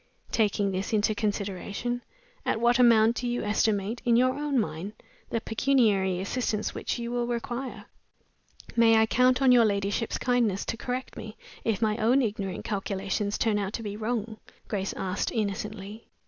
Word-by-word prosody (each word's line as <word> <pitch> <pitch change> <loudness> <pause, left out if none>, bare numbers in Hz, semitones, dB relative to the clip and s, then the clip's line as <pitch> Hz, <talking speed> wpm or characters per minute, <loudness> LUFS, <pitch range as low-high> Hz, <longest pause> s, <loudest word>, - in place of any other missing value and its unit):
Taking 205 -2 +1
this 190 +3 -3
into 215 0 +2
consideration, 205 +3 -3 0.4
at - - 0
what 240 +1 +3
amount 230 -1 +5
do 245 - -2
you 240 0 -1
estimate, 210 +1 0
in 240 -2 +3
your 255 +2 +4
own 290 -1 -1
mind, 200 -2 -2 0.4
the 230 - 0
pecuniary 220 -6 +2
assistance 215 +1 -2
which - - -3
you 235 0 -4
will 240 -1 -1
require?" 245 +2 -4 0.9
"May 225 -1 +6
I 220 - +5
count 255 +3 +3
on 260 - +6
your 245 -2 +7
ladyship's, 205 +1 0
kindness 235 -6 +1
to - - -2
correct 250 +2 -4
me 215 -1 -8 0.3
if 225 -1 0
my 215 0 +1
own 245 +5 +3
ignorant 200 -4 -3
calculations 200 0 -2
turn 215 -2 +1
out 200 0 -3
to 230 - -4
be 205 -1 -4
wrong?" 220 0 -3 0.3
Grace 195 -2 -2
asked, 185 +1 -2
innocently. 210 0 -4
220 Hz, 160 wpm, -27 LUFS, 205-240 Hz, 0.9 s, your